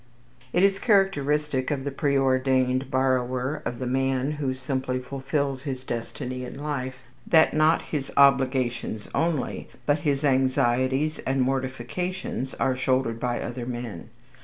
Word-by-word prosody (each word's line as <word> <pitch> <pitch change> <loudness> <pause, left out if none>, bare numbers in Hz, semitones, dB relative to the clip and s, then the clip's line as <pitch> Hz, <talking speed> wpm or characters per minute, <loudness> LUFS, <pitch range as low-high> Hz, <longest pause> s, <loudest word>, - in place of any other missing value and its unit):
It 175 - +2
is 195 0 +4
characteristic 150 - +2
of 140 -2 -1
the 140 - -3
preordained 130 -2 +1
borrower, 130 +1 0
of 120 - -3
the 130 - -4
man 135 +2 0
who 140 -3 -2
simply 130 -1 -2
fulfils 135 +1 -2
his 135 -3 -5
destiny 125 +1 -4
in 125 - -7
life, 140 -3 -3 0.3
that 160 -1 +5
not 155 +2 +3
his 145 -3 -4
obligations 130 -5 +2
only, 165 -4 -1 0.2
but 145 +1 +2
his 145 -2 0
anxieties 130 +2 +2
and 135 0 -1
mortifications 135 +4 -3
are 130 -1 +1
shouldered 130 -3 0
by 120 0 -1
other 120 0 -5
men. 120 -8 -6
130 Hz, 135 wpm, -26 LUFS, 130-145 Hz, 0.3 s, that